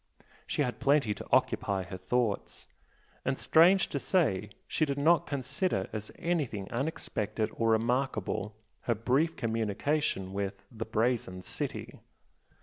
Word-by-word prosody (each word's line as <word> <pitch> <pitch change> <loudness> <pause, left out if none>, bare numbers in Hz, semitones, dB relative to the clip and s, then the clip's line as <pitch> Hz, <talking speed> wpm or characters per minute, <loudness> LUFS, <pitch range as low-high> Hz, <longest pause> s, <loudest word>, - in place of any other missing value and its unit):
She 150 - +1
had 125 -4 -3
plenty 140 -6 +3
to - - -9
occupy 95 -2 +2
her 95 +1 -7
thoughts 110 +2 -1 0.6
and 135 0 0
strange 175 +4 +5
to 140 - -2
say 105 - +1 0.2
she - - 0
did 140 -2 0
not 160 +4 +4
consider 140 - -1
as 110 -1 -5
anything 145 - -1
unexpected 110 -5 -2
or 115 0 +1
remarkable, 110 -2 0 0.3
her 115 - +4
brief 135 +9 +1
communication 110 -1 -1
with 100 0 -3
the 110 -1 -5
"Brazen 110 -5 0
City." - - -5
115 Hz, 130 wpm, -30 LUFS, 105-145 Hz, 0.6 s, strange